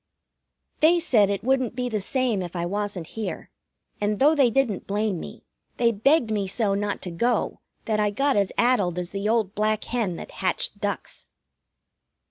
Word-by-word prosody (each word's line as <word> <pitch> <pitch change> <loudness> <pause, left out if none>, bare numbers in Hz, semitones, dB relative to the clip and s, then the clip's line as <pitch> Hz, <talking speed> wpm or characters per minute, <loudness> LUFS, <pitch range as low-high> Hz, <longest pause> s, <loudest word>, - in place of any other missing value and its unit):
They 335 +3 +5
said 220 - +3
it 200 0 -2
wouldn't 260 -2 +1
be 250 0 -1
the 215 -4 -2
same 245 -2 0
if 175 0 -6
I 170 0 -1
wasn't 200 -2 -3
here, 220 +6 -6 0.5
and 210 0 0
though 290 +6 +5
they 275 -5 +4
didn't 230 -5 0
blame 205 -2 -1
me, - - -10 0.3
they 235 -1 +3
begged 235 +3 +2
me 205 -2 0
so 200 +1 0
not 205 0 -2
to 180 - -4
go 235 +8 0 0.3
that 215 -1 0
I 210 0 +2
got 275 +7 +1
as 200 -2 +2
addled 205 -8 +2
as 180 0 -3
the 200 +1 -2
old 220 -4 +1
black 215 0 0
hen 225 -8 -1
that - - -8
hatched - - -1
ducks. - - -4
215 Hz, 180 wpm, -25 LUFS, 200-245 Hz, 0.5 s, They